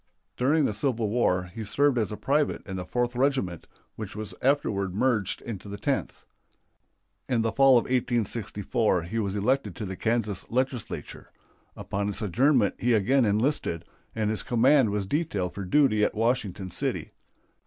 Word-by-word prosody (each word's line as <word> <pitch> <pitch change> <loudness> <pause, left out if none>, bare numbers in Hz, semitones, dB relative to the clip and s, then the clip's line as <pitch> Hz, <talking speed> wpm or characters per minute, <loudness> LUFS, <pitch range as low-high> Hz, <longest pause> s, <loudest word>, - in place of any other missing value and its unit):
During 145 +6 +2
the 110 - 0
Civil 110 0 0
War 90 -6 +1
he 115 - -5
served 135 +4 +2
as 110 -3 -1
a 105 - -5
private 145 +2 0
in 95 - -5
the 90 -1 -5
Fourth 120 0 -1
Regiment, 125 - 0 0.3
which 110 -3 -7
was 110 -1 -6
afterward 100 -9 +1
merged 110 -4 0
into 105 -3 -7
the 100 - -6
Tenth. - - -2 1.0
In 115 -3 +2
the 115 - 0
fall 135 0 +6
of 120 - +2
1864 115 -5 0
he 105 +7 -3
was 100 -2 -2
elected 105 -2 0
to 105 - -5
the 95 0 -5
Kansas 110 -2 -1
Legislature. 130 -1 -3 0.4
Upon 100 +1 -3
its 105 +2 -5
adjournment 120 - +3
he 120 0 +2
again 120 +5 +3
enlisted, 105 - 0 0.3
and 110 -1 0
his 110 - -2
command 125 +1 +4
was 100 -1 -1
detailed 100 - -1
for 100 - -5
duty 110 -1 +3
at - - +1
Washington 105 -5 -1
City. - - -3
110 Hz, 165 wpm, -27 LUFS, 100-130 Hz, 1.0 s, fall